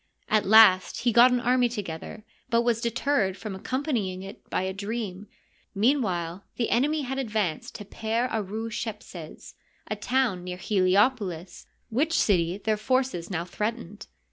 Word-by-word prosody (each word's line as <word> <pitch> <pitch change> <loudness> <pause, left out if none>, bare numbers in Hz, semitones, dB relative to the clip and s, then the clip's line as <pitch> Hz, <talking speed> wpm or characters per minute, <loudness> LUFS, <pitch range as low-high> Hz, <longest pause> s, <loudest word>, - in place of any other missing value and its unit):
At 215 -2 +2
last 205 -3 +6
he 240 - +2
got 240 +2 +7
an 250 -1 +1
army 245 0 +2
together, 205 -2 -6 0.3
but 235 -1 +3
was 235 -1 +1
deterred 235 -4 0
from 210 0 -6
accompanying 210 -4 -2
it 195 - -11
by - - -1
a 190 0 -2
dream. 205 -1 -5 0.5
Meanwhile 195 - 0
the 235 - -1
enemy 295 +5 +2
had 265 +1 -3
advanced 210 - -2
to 205 - -7
Per 225 +4 -1
ArU'ShepseSt 215 -5 -5 0.4
a. - - +1
town 220 -4 0
near 180 0 -5
Heliopohs, 190 -2 +1 0.2
which 300 +8 +1
city 175 -3 +2
their 215 +1 -1
forces 255 -6 -1
now 175 -3 -2
threatened. 210 +1 -4
215 Hz, 140 wpm, -26 LUFS, 190-240 Hz, 0.5 s, got